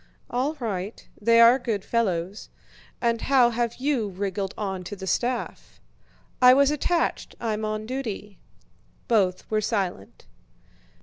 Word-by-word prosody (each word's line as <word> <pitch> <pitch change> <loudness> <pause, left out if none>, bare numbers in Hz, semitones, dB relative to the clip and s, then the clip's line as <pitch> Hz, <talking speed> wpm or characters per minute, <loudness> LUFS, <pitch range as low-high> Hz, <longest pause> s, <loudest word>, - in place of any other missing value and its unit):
"All 265 +6 0
right. 210 -6 -5
They 230 +2 +5
are 235 +3 +7
good 220 -5 -3
fellows. 195 -4 -1 0.5
And 230 -1 +1
how 255 -3 +4
have 235 0 -1
you 260 -6 -1
wriggled 195 0 -3
onto 190 -1 -4
the 190 -1 -8
staff?" 240 +6 -2 0.6
"I 250 0 +8
was 280 +1 +4
attached; 330 +3 -1
I'm 220 -2 -2
on 215 0 -3
duty." 220 -5 -5 0.7
Both 190 -5 +1
were 215 0 +2
silent. 190 - -3
220 Hz, 125 wpm, -25 LUFS, 195-245 Hz, 0.7 s, I